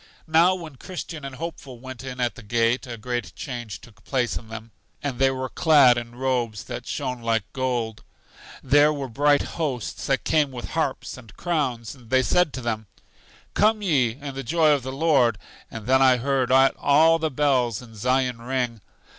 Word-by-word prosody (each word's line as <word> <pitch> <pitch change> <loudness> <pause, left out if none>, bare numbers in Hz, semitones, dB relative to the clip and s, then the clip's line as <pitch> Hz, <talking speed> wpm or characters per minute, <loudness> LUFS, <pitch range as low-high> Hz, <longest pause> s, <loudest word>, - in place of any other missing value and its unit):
Now, 170 +3 +4
when 160 -7 -9
Christian 170 -3 -7
and 135 -1 -6
Hopeful 145 -5 -7
went 130 0 -9
in 125 -1 -7
at 120 -1 0
the - - -12
gate 115 +3 0
a 120 -1 -6
great 120 +2 -4
change 120 -5 -6
took 115 -1 -18
place 125 -3 -1
in 110 - -6
them, 115 0 -8 0.3
and 135 -4 -3
they 135 0 +5
were 130 0 -3
clad 140 -3 +5
in 120 0 -6
robes 120 -4 -1
that - - -7
shone 125 -1 -3
like 115 -2 +1
gold. 120 -5 -2 0.6
There 145 +1 +5
were 140 -3 -4
bright 145 +4 +2 0.2
hosts 130 -7 -3
that 135 -1 +1
came 150 -3 +2
with 125 -2 -7
harps 160 -6 -2
and 115 -4 -15
crowns, 130 - -2
and 125 -4 -17
they 130 +1 +3
said 180 +2 +2
to 130 - -5
them: 110 -3 -3 0.7
Come, 215 0 +2
ye, 135 - +2
in 140 -1 -6
the 135 - -5
joy 155 +4 +3
of 145 -2 +2
the 130 +1 -5
Lord. 135 -6 +2 0.3
And 110 -2 -8
then 130 +2 +4
I 130 -1 +6
heard 130 0 0
all 145 +4 +4
the 160 -1 0
bells 130 -6 +1
in 120 -3 -13
Zion 125 +2 0
ring. 120 -3 -2
130 Hz, 190 wpm, -24 LUFS, 120-145 Hz, 0.7 s, I